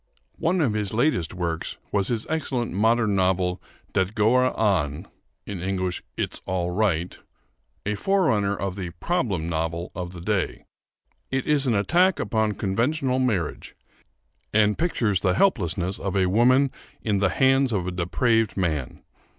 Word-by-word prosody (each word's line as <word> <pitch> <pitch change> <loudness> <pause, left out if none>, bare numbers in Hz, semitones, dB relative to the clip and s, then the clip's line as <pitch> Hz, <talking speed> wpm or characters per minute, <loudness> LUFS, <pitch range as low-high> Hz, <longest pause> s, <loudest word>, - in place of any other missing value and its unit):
One 175 +2 +1
of 125 -8 +2
his 105 -1 -2
latest 120 - +1
works 85 -2 -3
was 100 -2 +1
his 115 -2 -1
excellent 135 - -2
modern 110 +1 +2
novel, 90 -1 +1 0.3
'Det 95 +3 0
Går 125 +4 +3
An' 85 -6 +1 0.4
(It's 95 -1 -3
All 90 -1 -1
Right), 90 -4 0 0.7
a 105 - 0
forerunner 105 - +1
of 95 -2 -3
the 95 -3 -4
"problem 110 - -1
novel" 85 +1 -2
of 90 0 -5
the 90 - -8
day. 95 +1 -2 0.6
It 135 -1 -1
is 145 -2 +2
an 120 - +2
attack 175 - +3
upon 110 -2 0
conventional 125 +7 0
marriage, 105 -12 -1 0.8
and 105 -1 +3
pictures 115 - 0
the 90 0 +1
helplessness 95 - +1
of 95 0 -2
a 95 - +3
woman 125 +8 +4 0.3
in 105 -3 +1
the 100 -1 +3
hands 135 +2 +3
of 95 -5 -1
a 90 - -2
depraved 110 +6 +1
man. 80 -8 -2
100 Hz, 140 wpm, -24 LUFS, 90-125 Hz, 0.8 s, woman